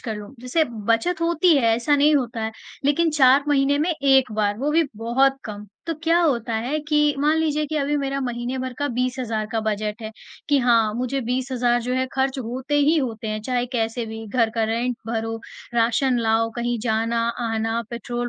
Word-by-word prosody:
कर 220 -3 -4
लूँ, 210 +6 -10
जैसे 280 +6 +1 0.2
बचत 320 +10 +1
होती 340 0 +3
है 270 - +2
ऐसा 240 +5 +1
नहीं 295 +2 +4
होता 235 -4 -2
है, 220 0 -3 0.3
लेकिन 320 +3 +2
4 275 -1 +5
महीने 285 0 +3
में 330 +4 +1
एक 270 -4 +3
बार 205 -1 0
वो 285 +4 0
भी 330 +2 +4
बहुत 265 +4 +2
कम 210 -1 -7 0.2
तो 330 - -1
क्या 330 +1 +3
होता 240 -8 0
है 250 +7 -1
कि 295 -1 +3
मान 300 +2 +2
लीजिए 305 -1 0
कि 310 +1 -3
अभी 290 0 0
मेरा 275 -1 -2
महीने 245 0 -3
भर 260 0 -4
का 285 - 0
20,000 245 -3 -2
का 225 - 0
बजट 215 +1 -3
है 220 - -5 0.4
कि 285 - +4
हाँ 230 -4 +3
मुझे 255 +3 -2
20,000 245 0 0
जो 250 +1 -2
है 260 0 0
खर्च 265 0 0
होते 255 +4 -4
ही 300 +3 +4
होते 230 -5 -3
हैं, 215 0 -3
चाहे 250 0 -1
कैसे 230 0 -1
भी 220 0 -7
घर 230 0 +1
का 225 - +1
रेंट 235 +2 -1
भरो, 225 0 -2 0.4
राशन 240 +2 +2
लाओ, 225 0 +2
कहीं 240 0 -1
जाना-आना, 230 0 -1
पेट्रोल 240 +1 -4
250 Hz, 195 wpm, -23 LUFS, 225-280 Hz, 0.4 s, 4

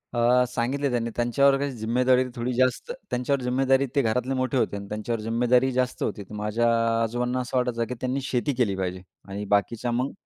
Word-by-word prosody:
अ, 120 +1 +4
सांगितलं 130 +4 -1
त्यांनी. 115 -1 -1
त्यांच्यावर 135 +4 +3
काही 140 0 -2
जिम्मेदारी 125 +3 +2
थोडी 120 +1 -2
जास्त 130 - +1 0.2
त्यांच्यावर 130 +2 0
जिम्मेदारी 135 +2 +2
ते 140 - +4
घरातले 125 +2 0
मोठे 130 0 0
होते 120 - 0
आणि 100 0 -8
त्यांच्यावर 110 +2 -3
जिम्मेदारी 125 +3 +2
जास्त 125 0 -1
होती. 100 - -3
तर 100 - -14
माझ्या 105 +3 0 0.3
आजोबांना 120 +2 -1
असं 125 +1 -2
वाटायचं, 125 -2 0
की - - -2
त्यांनी 130 +2 -1
शेती 135 +2 -1
केली 115 -6 +1
पाहिजे. 90 -1 -3 0.3
आणि 100 +1 -5
बाकीच्या 115 +4 -1
मग 125 +3 -1
125 Hz, 185 wpm, -25 LUFS, 115-130 Hz, 0.3 s, अ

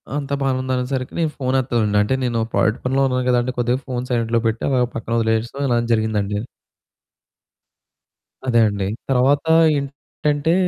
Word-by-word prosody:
అంతా 140 -1 -3
బానే 135 -1 +1
ఉంది 130 0 -4
అనేసరికి 130 +1 -3
నేను 160 -2 +1
ఫోను 130 -1 0
ఎత్తలేదండి, 115 -5 0
అంటే 130 - 0
నేను 120 -2 0
ప్రాజెక్ట్ 110 +2 +2
పనిలో 135 +2 +1
ఉన్నాను 130 -1 -1
కదండీ! 125 0 +1
కొద్దిగా 120 +1 +1
ఫోను 125 -1 -3
సైలెంట్‍లో 115 -1 +1
పెట్టి, 115 +1 -2
అలా 130 -2 +2
పక్కన 115 +1 -4
వదిలేసి 115 +1 0
ఇలా 120 - +2 0.2
జరిగిందండి. 105 -2 0 2.1
అదే 120 -2 +3
అండి. 100 -2 -2 0.2
తర్వాత 135 +2 +3 0.3
ఏంటంటే 145 +3 -2
125 Hz, 145 wpm, -20 LUFS, 115-135 Hz, 2.1 s, అదే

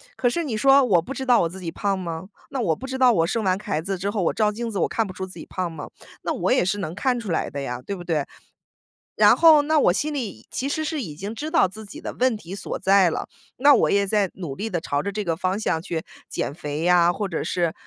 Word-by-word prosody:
可 245 - +2
是 335 +5 -2
你 235 -6 -2
说 275 +5 +6
我 180 -7 +4
不 265 +11 -7
知 265 -1 -5
道 245 -2 +5
我 165 - 0
自 190 +2 -9
己 170 -2 -4
胖 200 -2 -1
吗？ 170 +2 -5 0.2
那 265 -3 -2
我 170 -7 +2
不 265 - -7
知 265 0 -4
道 255 -2 +6
我 165 -6 +2
生 225 +2 -1
完 185 0 +1
孩 205 -8 -2
子 195 +2 -3
之 195 +3 -2
后， 205 -3 -1
我 - - +1
照 215 -1 +2
镜 230 +2 -4
子 195 - -3
我 - - +2
看 225 - 0
不 190 - -7
出 190 +1 -5
自 185 - -12
己 - - -8
胖 185 -2 -3
吗？ 160 -2 -8 0.3
那 - - -1
我 - - +1
也 - - +3
是 200 +3 0
能 180 -3 -4
看 250 +3 0
出 210 -6 -5
来 - - 0
的 140 - -5
呀， 125 -2 -4
对 200 - -3
不 - - -9
对？ 155 -5 0 0.9
然 - - +6
后 315 -3 +7
那 310 0 +2
我 175 - +4
心 300 +8 -1
里 220 - -5
其 275 +2 -2
实 315 +2 -1
是 300 -2 -2
已 155 -9 -6
经 200 +6 -6
知 300 +7 -5
道 320 - +4
自 215 +4 -10
己 200 - -10
的 - - -6
问 250 -3 +1
题 180 -1 -10
所 200 - -4
在 195 -2 +4
了， - - -4 0.3
那 285 +3 +6
我 - - +3
也 200 0 +3
在 200 -2 +1
努 170 -8 -6
力 220 +7 -4
地 175 -4 -1
朝 145 -2 -1
着 200 - -3
这 210 +1 -3
个 165 -3 -1
方 185 +4 -1
向 160 -6 0
去 165 -3 -4 0.3
减 - - -3
肥 150 -1 -5
呀， 175 0 +5
或 200 +3 -3
者 170 - -3
是， 170 -3 0
195 Hz, 305 characters per minute, -23 LUFS, 170-240 Hz, 0.9 s, 后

